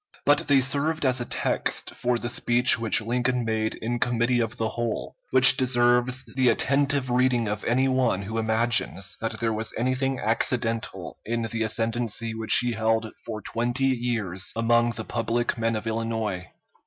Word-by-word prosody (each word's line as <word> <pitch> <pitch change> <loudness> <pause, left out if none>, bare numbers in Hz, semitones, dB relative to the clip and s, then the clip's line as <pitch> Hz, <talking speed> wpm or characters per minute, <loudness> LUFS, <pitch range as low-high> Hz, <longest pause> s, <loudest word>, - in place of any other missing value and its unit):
But 145 0 +3
they 140 -2 +4
served 145 +3 0
as 130 -1 +2
a - - -2
text - - -2
for 125 0 -1
the 120 - -1
speech 120 0 +3
which 115 -1 +2
Lincoln 120 +2 -1
made 110 -1 -2
in 120 +2 -4
Committee 120 +1 +1
of 115 +1 -3
the 110 -2 -2
Whole, 120 -1 -4
which 130 0 +8
deserves 125 0 +2
the 130 -2 +3
attentive 140 -1 +1
reading 125 -2 +1
of 105 +1 -4
any 130 +3 +1
one 130 -7 0
who 110 +3 -4
imagines 110 -3 0
that 115 -1 -4
there 115 -1 -1
was 110 +1 -3
anything 130 +2 -1
accidental 115 +1 -2
in 115 +1 -3
the 115 0 -4
ascendency 115 +1 0
which 110 0 +3
he 120 0 -1
held 110 0 -1
for 110 -3 -7
twenty 120 +3 -1
years 115 -7 -2
among 120 +1 +2
the 110 0 -6
public 120 +1 -2
men 115 0 0
of 110 +1 -5
Illinois. 110 -4 -3
120 Hz, 165 wpm, -24 LUFS, 110-125 Hz, -, which